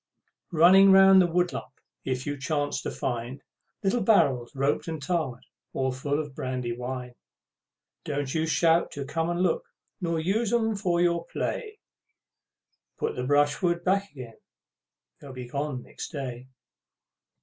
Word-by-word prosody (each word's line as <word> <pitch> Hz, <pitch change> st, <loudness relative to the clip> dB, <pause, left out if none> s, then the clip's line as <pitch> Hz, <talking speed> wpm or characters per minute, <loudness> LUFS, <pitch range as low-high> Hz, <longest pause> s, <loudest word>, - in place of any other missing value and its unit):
Running 185 Hz, +4 st, +7 dB
round 190 Hz, 0 st, +8 dB
the 180 Hz, -, +3 dB
woodlump 175 Hz, 0 st, -1 dB, 0.3 s
if 130 Hz, -1 st, -3 dB
you 145 Hz, -1 st, -2 dB
chance 145 Hz, 0 st, -2 dB
to -, -, -4 dB
find 125 Hz, +2 st, -4 dB, 0.4 s
Little 230 Hz, +5 st, +1 dB
barrels, 145 Hz, -, +3 dB
roped 140 Hz, +4 st, 0 dB
and 160 Hz, -1 st, -4 dB
tarred, 145 Hz, -5 st, -2 dB, 0.3 s
all 130 Hz, 0 st, 0 dB
full 140 Hz, +3 st, -2 dB
of 150 Hz, -3 st, -5 dB
brandy 125 Hz, -3 st, -3 dB
wine, 125 Hz, 0 st, -5 dB, 0.9 s
Don't 145 Hz, -2 st, -3 dB
you 160 Hz, 0 st, 0 dB
shout 165 Hz, +1 st, +3 dB
to 140 Hz, -1 st, -5 dB
come 165 Hz, +4 st, -2 dB
and 175 Hz, +1 st, 0 dB
look, 475 Hz, -, +1 dB, 0.4 s
nor 170 Hz, -2 st, -1 dB
use 200 Hz, +7 st, 0 dB
'em 225 Hz, -2 st, +1 dB
for 180 Hz, -4 st, 0 dB
your 170 Hz, -1 st, +1 dB
play. 430 Hz, -3 st, -4 dB, 1.2 s
Put -, -, -2 dB
the 125 Hz, -1 st, -3 dB
brishwood 145 Hz, +5 st, +2 dB
back 195 Hz, +2 st, +1 dB
again, 130 Hz, -4 st, -9 dB
and -, -, -58 dB
they'll 140 Hz, -2 st, -10 dB
be 125 Hz, -1 st, -7 dB
gone 140 Hz, 0 st, -3 dB
next -, -, -8 dB
day! 130 Hz, -4 st, -6 dB
150 Hz, 150 wpm, -27 LUFS, 130-175 Hz, 1.2 s, round